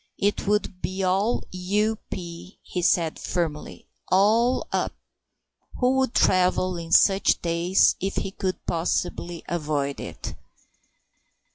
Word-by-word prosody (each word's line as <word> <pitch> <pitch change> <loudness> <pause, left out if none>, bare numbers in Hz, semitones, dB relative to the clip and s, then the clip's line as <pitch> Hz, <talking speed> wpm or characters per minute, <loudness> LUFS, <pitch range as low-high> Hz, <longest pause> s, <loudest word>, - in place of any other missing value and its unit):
"It 205 0 0
would 205 -3 0
be 190 +1 -3
all 195 +5 +1
U.P.," 185 -2 -3
he 180 - -4
said 170 -2 +2
firmly; 160 -4 -3 0.2
"all 225 +6 +3
up...." - - -1 0.8
Who 250 0 +2
would 265 -2 0
travel 185 0 +3
in 165 -1 -7
such 195 +2 +5
days 170 +2 +3
if 195 +1 -2
he 195 - -2
could 190 -1 -4
possibly 170 0 -2
avoid 150 -4 -2
it? - - -7
185 Hz, 115 wpm, -25 LUFS, 170-200 Hz, 0.8 s, such